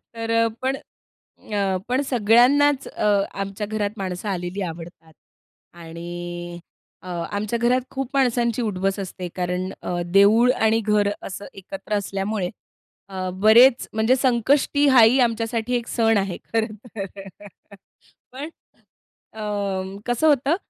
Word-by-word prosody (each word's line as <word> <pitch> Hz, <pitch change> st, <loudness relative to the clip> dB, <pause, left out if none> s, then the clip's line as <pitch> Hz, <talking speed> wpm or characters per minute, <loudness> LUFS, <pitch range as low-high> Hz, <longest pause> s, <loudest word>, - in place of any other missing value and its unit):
तर 230 Hz, 0 st, -3 dB
अ, -, -, +2 dB
पण 265 Hz, +1 st, 0 dB, 0.8 s
अ, 195 Hz, -2 st, +1 dB
पण 255 Hz, +2 st, +1 dB
सगळ्यांनाच 255 Hz, +5 st, +4 dB
अ, -, -, -4 dB, 0.3 s
आमच्या 195 Hz, +1 st, -4 dB
घरात 210 Hz, -1 st, -2 dB
माणसं 190 Hz, +1 st, -4 dB
आलेली 180 Hz, +1 st, -3 dB
आवडतात. 165 Hz, -2 st, -8 dB, 0.6 s
आणि 175 Hz, +1 st, -7 dB, 0.4 s
अ, -, -, -11 dB, 0.2 s
आमच्या 215 Hz, +3 st, -2 dB
घरात 250 Hz, +2 st, +2 dB
खूप 270 Hz, -1 st, -4 dB
माणसांची 245 Hz, -3 st, +1 dB
उठ-बस 195 Hz, -2 st, -1 dB
असते 185 Hz, -1 st, -6 dB
कारण 180 Hz, +1 st, -2 dB
अ, 175 Hz, -1 st, -3 dB
देऊळ 205 Hz, +7 st, +5 dB
आणि 225 Hz, -2 st, +2 dB
घर 210 Hz, -2 st, +2 dB
असं 200 Hz, +1 st, -7 dB
एकत्र 210 Hz, +3 st, -8 dB
असल्यामुळे 195 Hz, -1 st, -2 dB, 0.6 s
अ, 185 Hz, -1 st, -4 dB
बरेच 240 Hz, +4 st, +6 dB
म्हणजे 220 Hz, +4 st, +3 dB
संकष्टी 265 Hz, +3 st, +2 dB
हा 260 Hz, -3 st, +7 dB
ही 235 Hz, +4 st, +5 dB
आमच्यासाठी 230 Hz, 0 st, 0 dB
एक 235 Hz, -1 st, -2 dB
सण 225 Hz, -1 st, +2 dB
आहे 195 Hz, -3 st, -1 dB, 0.2 s
खरं 220 Hz, -1 st, 0 dB, 0.2 s
तर. 195 Hz, 0 st, -8 dB, 0.8 s
पण 280 Hz, +5 st, -6 dB, 0.8 s
अ, 200 Hz, -2 st, -3 dB
कसं 245 Hz, +6 st, +1 dB
होतं 285 Hz, +2 st, +3 dB
210 Hz, 130 wpm, -23 LUFS, 190-240 Hz, 0.8 s, हा